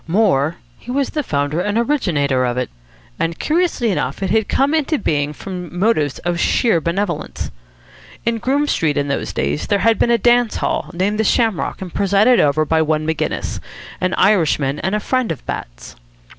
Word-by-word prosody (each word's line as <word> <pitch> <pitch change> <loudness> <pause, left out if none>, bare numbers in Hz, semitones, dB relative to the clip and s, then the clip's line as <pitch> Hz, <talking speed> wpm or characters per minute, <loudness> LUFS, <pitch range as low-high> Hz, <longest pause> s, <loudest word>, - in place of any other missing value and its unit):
More, 165 -5 +2 0.2
he - - -14
was 275 +2 0
the 300 - -1
founder 145 - -1
and 205 +3 -1
originator 160 - +1
of 125 0 -1
it. 125 - -2 0.5
And, 165 0 -1
curiously 315 - +1
enough, 155 -1 -2
it 190 - -1
had 220 -1 +2
come 275 +3 +2
into 310 0 +1
being 150 - 0
from 180 +2 -7
motives 175 - +1
of 175 0 0
sheer 220 -6 +2
benevolence. 170 0 -3 0.7
In 230 0 0
Groome 280 +5 +1
Street 160 - 0
in 145 0 0
those 140 - -2
days 75 +7 -2
there - - +2
had 230 -1 +4
been - - +3
a 235 - +4
dance 240 +1 +3
hall, - - -1
named 200 +5 -1
the - - +3
Shamrock 220 -5 0
and 180 - -9
presided 200 +5 +3
over 150 +1 +3
by 160 +1 +2
one 155 0 0
Maginnis, 160 0 -2 0.4
an 185 0 0
Irishman 155 -8 +2
and 190 +2 -1
a - - +1
friend 255 0 0
of 155 - -6
Bat's. - - -7
185 Hz, 185 wpm, -19 LUFS, 150-230 Hz, 0.7 s, had